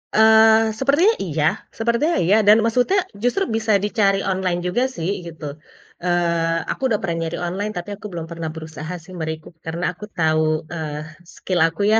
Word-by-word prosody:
Eee, 220 Hz, 0 st, +6 dB
sepertinya 290 Hz, +11 st, +4 dB
iya 155 Hz, -4 st, -1 dB, 0.3 s
sepertinya 235 Hz, +9 st, +1 dB
iya, 195 Hz, +5 st, +4 dB
dan 210 Hz, +1 st, +8 dB
maksudnya 250 Hz, -, +2 dB, 0.2 s
justru 245 Hz, +11 st, +2 dB
bisa 225 Hz, 0 st, 0 dB
dicari 205 Hz, -2 st, +2 dB
online 185 Hz, -2 st, -1 dB
juga 240 Hz, +8 st, +1 dB
sih, 165 Hz, -2 st, -2 dB, 0.2 s
gitu, 165 Hz, -2 st, -10 dB, 0.6 s
eee, 170 Hz, -2 st, 0 dB
aku -, -, -6 dB
udah 215 Hz, -5 st, 0 dB
pernah 170 Hz, -4 st, -2 dB
nyari 165 Hz, 0 st, -3 dB
online, 200 Hz, +4 st, -3 dB
tapi 175 Hz, +3 st, -5 dB
aku 205 Hz, -, -14 dB
belum 165 Hz, -2 st, -5 dB
pernah 165 Hz, -1 st, -4 dB
berusaha 160 Hz, +1 st, -7 dB
sih 185 Hz, +2 st, -13 dB
me-recook, 160 Hz, +1 st, -5 dB
karena 165 Hz, +2 st, -4 dB
aku 210 Hz, -, -8 dB
tahu, 155 Hz, -1 st, +2 dB, 0.3 s
eee, 155 Hz, -3 st, -4 dB, 0.4 s
skill 185 Hz, -2 st, -2 dB
aku 165 Hz, +4 st, -6 dB
ya, 220 Hz, -, +6 dB
185 Hz, 170 wpm, -21 LUFS, 165-220 Hz, 0.6 s, dan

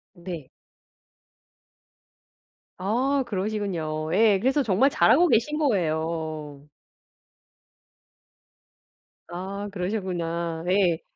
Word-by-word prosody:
네. 170 Hz, -6 st, -7 dB, 2.3 s
아 255 Hz, +9 st, +1 dB
그러시군요 185 Hz, -7 st, -2 dB
예. 205 Hz, 0 st, +4 dB
그래서 265 Hz, +6 st, +2 dB
정말 230 Hz, +4 st, +3 dB
잘하고 310 Hz, +3 st, +4 dB
계신 300 Hz, +3 st, +2 dB
거예요. 160 Hz, -, -2 dB, 2.6 s
아 195 Hz, +3 st, -5 dB
그러시구나. 175 Hz, -4 st, -3 dB
예. 180 Hz, -4 st, +2 dB
185 Hz, 150 characters per minute, -25 LUFS, 165-220 Hz, 2.6 s, 예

